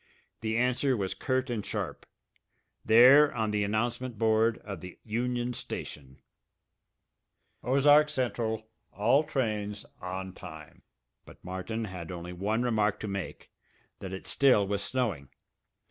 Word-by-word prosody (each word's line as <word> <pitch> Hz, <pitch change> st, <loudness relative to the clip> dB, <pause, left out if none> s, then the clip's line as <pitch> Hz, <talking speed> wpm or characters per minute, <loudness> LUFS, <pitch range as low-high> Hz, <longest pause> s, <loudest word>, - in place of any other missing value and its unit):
The 110 Hz, 0 st, -1 dB
answer 125 Hz, +1 st, +2 dB
was 95 Hz, -2 st, -2 dB
curt 130 Hz, 0 st, -1 dB
and 110 Hz, -4 st, -2 dB
sharp -, -, -5 dB, 0.8 s
there 130 Hz, +6 st, +7 dB
on 110 Hz, -2 st, 0 dB
the 105 Hz, -1 st, +1 dB
announcement 120 Hz, +3 st, -2 dB
board 110 Hz, +1 st, +3 dB
of 100 Hz, -5 st, -7 dB
the 90 Hz, 0 st, -10 dB
Union 120 Hz, +2 st, -2 dB
Station: 65 Hz, -, -8 dB, 1.4 s
OZARK 145 Hz, +3 st, +5 dB
CENTRAL 115 Hz, -5 st, -2 dB, 0.3 s
ALL 120 Hz, +8 st, +3 dB
TRAINS 105 Hz, -7 st, -2 dB, 0.2 s
ON 95 Hz, +1 st, -5 dB
TIME 80 Hz, -4 st, -11 dB, 0.4 s
But -, -, -16 dB
Martin 95 Hz, +5 st, -4 dB
had 90 Hz, -3 st, -7 dB
only 90 Hz, 0 st, -6 dB
one 105 Hz, +6 st, -1 dB
remark 110 Hz, -4 st, +1 dB
to 110 Hz, -, -4 dB
make, 100 Hz, -2 st, -6 dB, 0.5 s
that 95 Hz, -, -7 dB
it 95 Hz, -, -7 dB
still 130 Hz, -7 st, +4 dB
was 100 Hz, 0 st, -1 dB
snowing. 105 Hz, -, -2 dB
110 Hz, 130 wpm, -29 LUFS, 95-125 Hz, 1.4 s, there